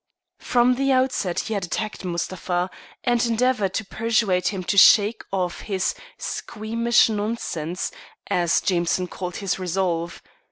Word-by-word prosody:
From 245 0 +3
the 275 0 +1
outset 255 -9 +1
he 220 - -4
had 200 -3 -1
attacked 215 +5 -4
Mustapha, 180 0 -2 0.3
and 240 -2 +2
endeavoured 235 -4 +1
to 220 - -2
persuade 220 -4 +1
him 195 -3 -2
to 200 - -1
shake 205 +2 +6
off 185 -2 -2
his 190 -3 -1 0.2
"squeamish 230 +2 +1
nonsense," 205 -6 -3 0.4
as 175 -2 +2
Jameson 180 0 0
called 180 -1 -5
his 195 -1 -2
resolve. 175 -2 -2
195 Hz, 130 wpm, -23 LUFS, 180-230 Hz, 0.4 s, shake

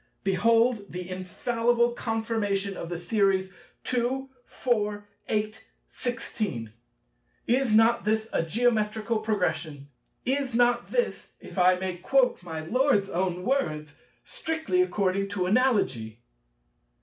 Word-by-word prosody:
Behold 225 +3 +2
the 180 0 -5
infallible 230 +6 0
confirmation 220 -4 -1
of 170 - -6
the 175 - -3
Series, 195 0 +1 0.3
2, 255 +2 -1
4, 210 -4 -1 0.2
8, 215 0 -2 0.2
16: 210 - -4 0.7
is 250 0 +2
not 225 +2 +5
this 220 +1 0
a - - +2
Geometrical 220 +3 +1
Progression? 180 -9 -2 0.4
Is 265 -1 0
not 240 0 +3
this—if 485 - -3
I 180 +1 +6
might 180 -1 -4
quote 255 0 +2
my 165 -3 -5
Lord's 220 - +2
own 180 0 -1
words—"strictly 275 - -2
according 195 - 0
to 195 -3 -1
Analogy"? 185 - +1
215 Hz, 105 wpm, -27 LUFS, 185-240 Hz, 0.7 s, I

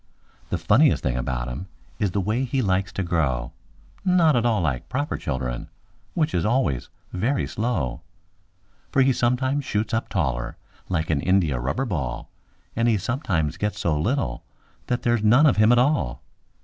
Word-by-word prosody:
The - - 0
funniest - - +3
thing 65 -2 0
about 60 -1 -2
him 65 +10 -6 0.3
is 105 - +1
the 100 - -1
way 110 +7 0
he 130 0 0
likes 95 -1 0
to 95 - -2
grow— 70 -8 0 0.5
Not 180 -5 +4
at 120 0 +2
all 110 -3 +2
like 70 -7 -2
proper 145 +3 -1
children, 65 -4 -3 0.5
which 160 -2 +1
is 85 - +1
always 105 - 0 0.2
very 120 +9 0
slow; 90 - -2 0.9
For 135 -2 +4
he 135 0 +3
sometimes 130 +4 +1
shoots 110 -2 -2
up 110 - -1
taller 65 -9 -1 0.3
like 80 -3 0
an 70 -3 +1
india 85 -8 +2
rubber 70 - -1
ball, 70 - -4 0.4
And 115 +1 +2
he 115 -2 +3
sometimes 90 - -1
gets 105 +2 -2
so 85 -3 +1
little 75 - -1 0.4
that 125 - -1
there's 120 -2 +2
none 120 +8 +6
of 140 - +4
him 110 +2 +5
at 120 - +5
all. 125 - +1
100 Hz, 170 wpm, -24 LUFS, -, 0.9 s, none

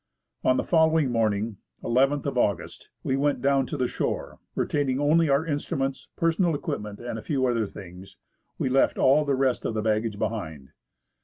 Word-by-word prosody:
On 130 - +3
the - - 0
following 160 -4 +3
morning 110 -2 0 0.3
(nth 135 +4 +2
of 140 - -2
August) 105 -5 -1
we 130 - 0
went 145 +1 +1
down 135 -1 +2
to 150 - -4
the 130 -2 +1
shore. - - -3 0.2
Retaining 140 -3 0
only 155 +2 +3
our 140 +3 +2
instruments, 135 -3 -2
personal 165 0 +1
equipment, 105 -7 -4
and 120 -2 -5
a - - -8
few 135 -1 0
other 115 -4 +1
things, 95 -1 -11 0.4
we - - -1
left 130 +1 +2
all 145 +3 +4
the 140 -1 +1
rest 130 -2 +1
of 110 - -2
the 110 - -1
baggage 110 -1 0
behind. 80 - -4
130 Hz, 175 wpm, -26 LUFS, 110-145 Hz, 0.4 s, all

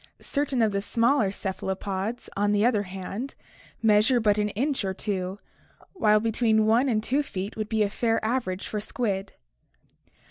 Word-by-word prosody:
Certain 280 -4 0
of 215 - +2
the 200 0 -1
smaller 230 +1 +2
cephalopods, 195 +2 -3
on 205 +1 +2
the 205 +1 +3
other 230 -4 +3
hand, 195 +6 -6 0.5
measure 220 +3 +4
but 210 -2 +2
an 210 0 +1
inch 275 0 0
or 190 -1 -2
two, 190 -2 -3 0.6
while 215 - +4
between 220 0 +2
1 235 +5 +3
and 215 -3 +1
2 275 +5 +1
feet 200 -7 -5
would 215 -1 -4
be 220 -1 +2
a - - +2
fair 225 0 +1
average 220 -6 -1
for 210 - -3
squid. 205 -2 -2
215 Hz, 165 wpm, -26 LUFS, 200-235 Hz, 0.6 s, measure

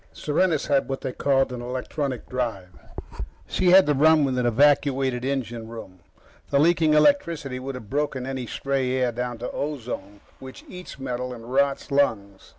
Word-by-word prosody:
Serenus 155 0 0
had 140 -2 +1
what 135 - -3
they 130 - -3
called 135 0 +1
an 120 - -5
electronic 130 +2 -4
drive. 115 -8 -3 0.8
She 185 - +1
had 190 +1 +8
to 150 - +2
run 155 +2 +5
with 130 -2 -1
an 120 - +1
evacuated 135 0 +2
engine 120 -4 -3
room. 110 -5 -10 0.5
The 140 - +2
leaking 160 0 +3
electricity 150 - +2
would 135 +1 -6
have 110 -4 -9
broken 135 0 -2
any 130 -2 -4
stray 135 -1 -1
air 130 -2 +1
down 120 0 -4
to 120 - -5
ozone, 120 -8 -5 0.2
which 130 0 -11
eats 180 -4 -10
metal 125 -1 -4
and 115 +2 -10
rots 140 +1 +1
lungs. 100 -9 0
135 Hz, 165 wpm, -24 LUFS, 125-145 Hz, 0.8 s, had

